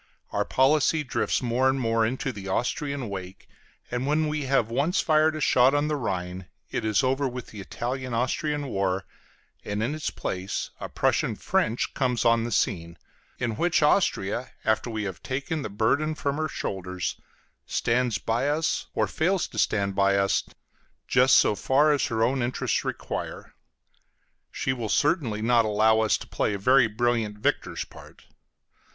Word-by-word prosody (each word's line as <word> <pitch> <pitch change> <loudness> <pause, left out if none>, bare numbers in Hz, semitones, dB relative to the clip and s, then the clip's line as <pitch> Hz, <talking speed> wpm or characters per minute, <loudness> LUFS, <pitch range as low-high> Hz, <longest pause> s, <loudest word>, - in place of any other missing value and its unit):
Our - - 0
policy 150 +3 +3
drifts 130 - -1
more 125 +2 +2
and 135 0 0
more 115 -2 +1
into 130 +3 -2
the 100 -4 -8
Austrian 135 +5 -2
wake; 95 -2 -8 0.4
and 125 +2 -2
when 155 +1 +2
we 150 -1 -2
have 130 -4 +1
once 155 +10 +1
fired 155 0 +3
a - - -4
shot 130 -1 +4
on 145 +1 +1
the 150 - 0
Rhine, 90 -7 -4 0.2
it - - -2
is 110 +4 +2
over 135 +2 +1
with 125 -1 -7
the 105 - -8
Italian 125 +5 -4
Austrian 145 +5 -1
war, 95 -5 -1 0.6
and 105 +1 -2
in 125 +6 -1
its 155 -1 -3
place 95 +1 -4
a - - -6
Prussian - - +1
French 115 +2 0
comes 125 -4 0
on 115 -1 +4
the 120 - -4
scene, 85 -4 -1 0.4
in 115 -3 -2
which 170 0 +2
Austria, 130 - +1 0.2
after 110 +2 +1
we 110 -2 -3
have 95 -4 -5
taken 140 +4 -3
the - - -4
burden 135 +10 +1
from 140 -1 -2
her 155 0 0
shoulders, 95 - -4 0.5
stands 120 -1 +1
by 115 +5 0
us 155 +2 0
or - - +2
fails 180 +3 0
to - - -5
stand 100 -2 +1
by 100 0 +3
us 100 0 +2 0.6
just 130 +1 +5
so - - +4
far 140 +8 +3
as 145 - +1
her 110 -3 0
own 130 +2 +1
interests 120 +1 -1
require. - - -5 1.0
She 130 - -1
will 115 -4 -4
certainly 130 - +1
not 120 0 +4
allow 110 +1 +3
us 110 -1 +2
to - - -11
play 105 - -1
a - - -2
very 125 +4 +4
brilliant 110 -1 0
victor's 105 - -1
part. - - -15
120 Hz, 170 wpm, -26 LUFS, 105-140 Hz, 1.0 s, just